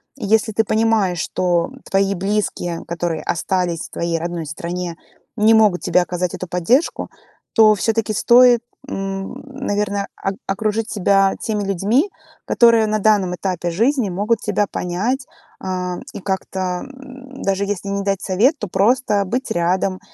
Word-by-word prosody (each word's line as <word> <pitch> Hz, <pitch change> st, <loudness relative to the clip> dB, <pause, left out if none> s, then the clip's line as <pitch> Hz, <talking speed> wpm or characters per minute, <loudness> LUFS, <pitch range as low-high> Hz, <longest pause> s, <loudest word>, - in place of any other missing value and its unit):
если 220 Hz, -2 st, +1 dB
ты 220 Hz, +1 st, +2 dB
понимаешь, 215 Hz, -5 st, +1 dB
что 175 Hz, +2 st, 0 dB, 0.2 s
твои 195 Hz, 0 st, +2 dB
близкие, 195 Hz, -3 st, -2 dB
которые 170 Hz, -1 st, -3 dB
остались 175 Hz, -1 st, -1 dB
в -, -, -28 dB
твоей 170 Hz, -1 st, -2 dB
родной 170 Hz, 0 st, -4 dB
стране, 170 Hz, +3 st, -5 dB, 0.4 s
не 215 Hz, +2 st, +5 dB
могут 210 Hz, -5 st, +4 dB
тебе 180 Hz, -, +3 dB
оказать 180 Hz, 0 st, -2 dB
эту 185 Hz, -, -6 dB
поддержку, 180 Hz, -, +1 dB, 0.4 s
то 215 Hz, -1 st, +6 dB
всё-таки 220 Hz, +1 st, 0 dB
стоит, 240 Hz, +2 st, +6 dB, 0.3 s
м, 195 Hz, -3 st, -4 dB
наверное, 205 Hz, -7 st, -2 dB, 0.2 s
ок 195 Hz, -, -1 dB
окружить 215 Hz, +2 st, -1 dB
себя 195 Hz, -1 st, +3 dB
теми 210 Hz, -2 st, -2 dB
людьми, 200 Hz, -, +1 dB, 0.4 s
которые 230 Hz, -2 st, +5 dB
на 215 Hz, 0 st, 0 dB
данном 205 Hz, -3 st, +2 dB
этапе 175 Hz, -1 st, -2 dB
жизни 230 Hz, -, +1 dB
могут 205 Hz, +5 st, 0 dB
тебя 205 Hz, -, 0 dB
понять, 215 Hz, +12 st, -2 dB, 0.3 s
а, 180 Hz, -1 st, -3 dB, 0.2 s
и -, -, -6 dB
как-то, 190 Hz, -2 st, -3 dB
м, 265 Hz, 0 st, -12 dB
даже 195 Hz, 0 st, 0 dB
если 200 Hz, -1 st, -3 dB
не 200 Hz, 0 st, -2 dB
дать 195 Hz, -1 st, -1 dB
совет, 225 Hz, -, +2 dB
то 210 Hz, -, -4 dB
просто 210 Hz, +1 st, +2 dB
быть 250 Hz, +7 st, -2 dB
рядом. 185 Hz, +1 st, 0 dB
200 Hz, 145 wpm, -20 LUFS, 180-220 Hz, 0.4 s, то